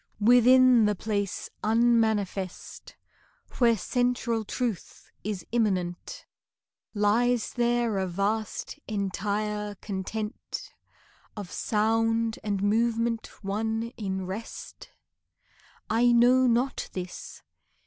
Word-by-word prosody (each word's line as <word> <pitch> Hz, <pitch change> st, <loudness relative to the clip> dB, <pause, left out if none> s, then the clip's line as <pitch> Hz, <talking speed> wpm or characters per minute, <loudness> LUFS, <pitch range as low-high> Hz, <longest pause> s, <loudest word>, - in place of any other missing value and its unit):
Within 245 Hz, +1 st, +6 dB
the 210 Hz, 0 st, +1 dB
place 205 Hz, -1 st, -3 dB, 0.2 s
unmanifest 220 Hz, -5 st, 0 dB, 0.6 s
Where 235 Hz, -2 st, +4 dB
central 245 Hz, 0 st, 0 dB
Truth 230 Hz, -2 st, -4 dB
is 200 Hz, -4 st, -4 dB
immanent, 195 Hz, -, -1 dB, 0.7 s
Lies 225 Hz, +3 st, +2 dB
there 240 Hz, -3 st, +1 dB
a 190 Hz, -, -1 dB
vast, 205 Hz, +9 st, -2 dB
entire 210 Hz, +1 st, -2 dB
content 210 Hz, +2 st, -5 dB, 0.6 s
Of 200 Hz, -4 st, -7 dB
sound 225 Hz, +1 st, +1 dB
and 200 Hz, -2 st, -1 dB
movement 230 Hz, +2 st, +1 dB, 0.2 s
one 220 Hz, +3 st, -2 dB
in 190 Hz, -3 st, -3 dB
rest? 195 Hz, +5 st, -8 dB, 1.0 s
I 235 Hz, +2 st, +3 dB
know 250 Hz, +2 st, +5 dB
not 245 Hz, +3 st, 0 dB
this. 180 Hz, -1 st, -7 dB
220 Hz, 85 wpm, -27 LUFS, 205-235 Hz, 1.0 s, Within